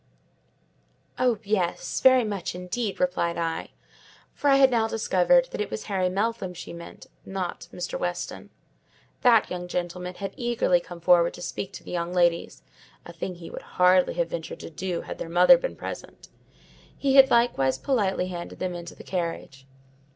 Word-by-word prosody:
"Oh, 250 -3 +3
yes; 195 -4 -1
very 260 -1 +6
much 200 -5 -4
indeed," 190 +4 -3
replied 180 -2 0
I; 165 -1 -2 0.6
for 290 - 0
I 275 - +6
had 270 -1 +6
now 225 -2 +2
discovered 225 +4 +3
that - - -3
it 210 - -3
was - - -5
Harry 190 -3 0
Meltham 195 -1 -2
she 170 - -8
meant, 170 0 -10 0.2
not 190 -2 -5
Mr. 175 0 -5
Weston. 175 0 -4 0.7
That 230 -4 +5 0.2
gentleman 180 +1 -4
had 195 0 -5
eagerly 235 -7 +1
come 175 0 -11
forward 170 0 +4
to - - -11
speak 195 +2 -4
to - - -9
the - - -9
young 175 0 -2
ladies: 175 -2 +1 0.4
a 170 - -10
thing 175 +2 -5
he 170 -1 -10
would - - -7 0.2
hardly 180 0 +4
have 170 -1 0
ventured 165 -1 -5
to - - -8
do 175 +2 -3
had - - -8
their 165 - -5
mother 180 +9 +7
been - - -4
present; - - -8 0.7
he 275 -1 +1
had 270 0 +8
likewise 235 - +2
politely 195 - 0
handed 175 -1 -7
them 185 -1 -3
into 175 0 -8
the - - -12
carriage. 165 -7 -4
180 Hz, 170 wpm, -26 LUFS, 175-220 Hz, 0.7 s, had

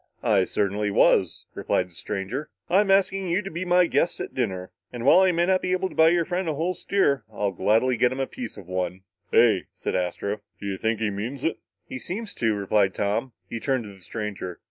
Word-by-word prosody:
"I 105 -5 +3
certainly 105 +2 0
was," 100 - +3
replied 90 0 -1
the - - -21
stranger. 105 - -4 0.2
"I'm 195 +2 +4
asking 195 0 +3
you 180 +5 +1
to 195 - -6
be 170 +3 -3
my 180 0 +5
guests 170 - +1
at - - -5
dinner. 95 -7 -2 0.2
And 120 -1 -5
while 145 - +7
I 190 -1 +5
may 170 0 +2
not 185 0 +2
be 185 - 0
able 185 0 0
to - - -13
buy 160 0 +6
your 170 0 +2
friend 180 0 -2
a 155 - -1
whole 170 +5 0
steer, 145 - +1
I'll 105 -1 -1
gladly 110 +7 +2
get 125 +2 +3
him 130 - -4
a 135 - +1
piece 245 - -7
of 95 -4 -11
one." 90 0 -3 0.3
"Hey," - - +4
said - - -4
Astro, 95 +3 -2 0.2
"do - - -8
you 95 -1 -3
think 110 -1 0
he 105 -2 +1
means 115 +7 -5
it?" 165 - -1 0.3
"He 130 - -6
seems 205 - -5
to," 115 -2 0
replied 100 -1 +1
Tom. 110 +5 -1
He 115 - -5
turned 130 0 0
to 105 -2 -10
the 95 - -17
stranger. 100 -2 -5
120 Hz, 230 wpm, -25 LUFS, -, 0.3 s, while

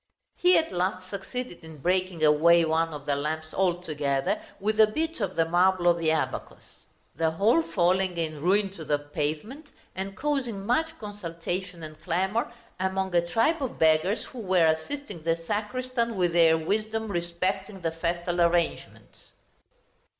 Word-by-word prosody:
He 360 +1 +5
at 320 - 0
last 185 0 -2
succeeded 200 0 -6
in 160 -1 -11
breaking 180 +1 0
away 165 +3 +5
one 160 +1 +1
of 145 -2 -8
the 145 -1 +1
lamps 155 +2 -3
altogether, 155 -7 0 0.2
with 215 +2 -1
a 220 - +8
bit 320 +8 -2
of 190 -2 -2
the 165 - +3
marble 175 +1 +3
of 170 -1 +4
the 165 -1 +1
abacus; 160 0 -4 0.3
the 165 -1 +1
whole 205 - +3
falling 185 - +1
in 155 -3 -3
ruin 195 +3 +2
to 170 -4 -9
the 150 -1 +1
pavement, 155 - -4 0.3
and 195 +1 -5
causing 255 -9 -2
much 320 +8 0
consultation 180 -3 -5
and 155 0 -10
clamor 190 +7 -1 0.3
among 190 0 -1
a 175 - +4
tribe 230 - +1
of 265 - -3
beggars 160 +6 +3
who 255 - -10
were 185 -5 +3
assisting 170 - -2
the 165 +1 +1
sacristan 230 +7 -2
with 175 -2 +1
their 165 -1 +5
wisdom 220 +6 -1
respecting 185 +3 -2
the 165 -1 -1
festal 175 +1 -2
arrangements. 170 0 -1
180 Hz, 155 wpm, -27 LUFS, 165-210 Hz, 0.3 s, a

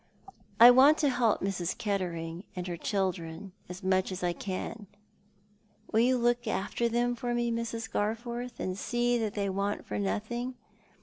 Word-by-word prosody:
"I 240 +2 +11
want 275 +5 +7
to 290 - +2
help 235 -4 +2
Mrs. 185 -2 -2
Kettering 175 -4 -3
and 180 -1 -4
her 175 -1 -3
children 185 -1 -3 0.2
as 180 +1 -8
much 190 0 +1
as 185 0 -5
I 175 -1 +1
can. 200 +4 -5 1.0
"Will 220 - +3
you 250 +2 +4
look 240 0 +1
after 235 +4 -1
them 240 +1 +1
for 240 0 -2
me, 240 0 0
Mrs. 230 -1 -3
Garforth, 235 +3 -3
and 185 - -2
see 240 +4 0
that 215 -3 -2
they 200 -1 -1
want 200 +1 -2
for 105 - -3
nothing 235 - -2
210 Hz, 165 wpm, -30 LUFS, 185-240 Hz, 1.0 s, I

